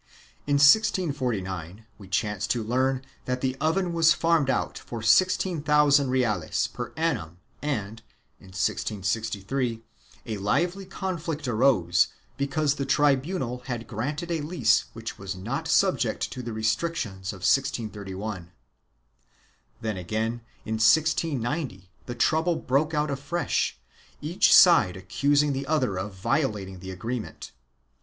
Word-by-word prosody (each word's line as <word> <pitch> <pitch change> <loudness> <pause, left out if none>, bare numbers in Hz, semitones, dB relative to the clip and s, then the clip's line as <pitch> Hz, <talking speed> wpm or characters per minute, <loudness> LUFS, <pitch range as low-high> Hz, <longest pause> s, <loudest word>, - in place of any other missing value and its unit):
In 145 - +2
1649 125 - +2
we 100 - -12
chance 105 +1 -1
to 120 -2 0
learn 130 +3 0 0.2
that 125 0 -2
the 130 -1 0
oven 170 +3 +1
was 165 0 +5
farmed 165 -4 +2
out - - 0
for 115 -2 -7
six 185 +8 +5
thousand 150 -5 +3
reales 115 -10 0
per - - -6
annum 80 +1 -1 0.2
and, 110 -7 -3 0.4
in 95 - -16
1663, 110 +5 -2 0.4
a 110 - -4
lively 175 - 0
conflict 165 -6 -4
arose 110 -8 +3 0.3
because 140 +1 0
the 140 -2 -3
tribunal 140 -1 +1
had 120 -3 -4
granted 145 - -4
a 165 -2 -1
lease 145 -7 +2
which 115 0 -7
was 95 -1 -5
not 95 - -4
subject - - +1
to 130 - -6
the 120 -1 -5
restrictions 110 - -2
of 95 -3 -7
1631. 105 -7 -1 1.3
Then 110 -3 -2
again, 110 +6 -2 0.2
in 110 0 -2
1690, 140 - +1 0.2
the 120 - -5
trouble 160 +5 +2
broke 150 +3 0
out 150 0 0
afresh, 145 +6 -1 0.4
each 160 +5 +2
side 165 - +7
accusing 140 +10 +1
the 135 +1 -4
other 130 -11 0
of 95 +1 -5
violating 100 -4 -1
the 95 +1 -8
agreement. 110 +5 -5
125 Hz, 125 wpm, -26 LUFS, 105-150 Hz, 1.3 s, side